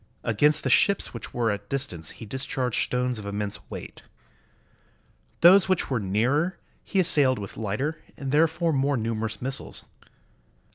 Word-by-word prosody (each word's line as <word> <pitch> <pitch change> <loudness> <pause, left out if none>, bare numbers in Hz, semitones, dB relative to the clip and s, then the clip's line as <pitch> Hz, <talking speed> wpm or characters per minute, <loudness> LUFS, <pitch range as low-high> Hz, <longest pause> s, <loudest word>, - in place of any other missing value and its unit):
Against 150 +7 +2
the - - 0
ships 200 - +3
which 115 - -7
were 115 -3 0
at 100 0 -3
a 100 - -31
distance 105 - -4
he - - -10
discharged 130 0 -1
stones 125 -2 -1
of 105 - -8
immense 100 0 -3
weight. - - -8 1.4
Those 185 +2 +7
which 185 -6 0
were 125 - +1
nearer 125 - 0 0.3
he 195 - -1
assailed 140 -7 +4
with 100 -2 -7
lighter, 110 +9 -3 0.2
and 135 -1 -4
therefore 160 +2 +2
more 140 0 +1
numerous 110 -1 -3
missiles. 135 +1 -2
130 Hz, 150 wpm, -26 LUFS, 110-150 Hz, 1.4 s, Those